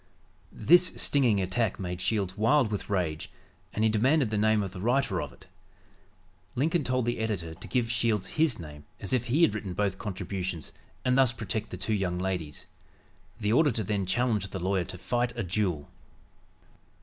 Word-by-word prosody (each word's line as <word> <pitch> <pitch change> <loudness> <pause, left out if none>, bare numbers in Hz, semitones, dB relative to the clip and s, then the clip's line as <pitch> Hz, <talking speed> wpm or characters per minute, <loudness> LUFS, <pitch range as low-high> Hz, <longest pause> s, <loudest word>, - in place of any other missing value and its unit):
This 175 +2 +5
stinging 125 -8 +3
attack 95 +3 0
made 90 -1 -4
Shields 95 -2 0
wild 115 +2 +3
with 105 - -4
rage, 85 -6 -1 0.4
and 110 - -1
he 110 - +5
demanded 125 +3 +3
the - - 0
name 110 0 +3
of 95 - -5
the 90 - -7
writer 120 -4 +1
of 70 - -5
it. 65 +9 -18 1.1
Lincoln 160 +5 +1
told 130 -2 0
the 120 -1 -1
editor 100 -8 -2
to 85 - -10
give 120 -3 0
Shields 115 -5 0
his 155 -6 +2
name 75 -3 -10
as 100 - -3
if 125 -2 +1
he 145 +8 +3
had 105 - +5
written 100 -4 -4
both 100 -1 0
contributions 95 -4 -4 0.3
and 125 0 +3
thus 130 -2 +5
protect 110 -1 -3
the 90 - -6
two 100 +4 -2
young 95 -4 0
ladies. 90 -5 -3 0.7
The 105 0 +1
auditor 125 -5 +3
then 100 -2 -1
challenged 105 -2 0
the 95 - -4
lawyer 95 0 0
to 95 0 -7
fight 120 +4 -1
a 115 - -1
duel. 90 -6 -1
105 Hz, 180 wpm, -28 LUFS, 95-120 Hz, 1.1 s, This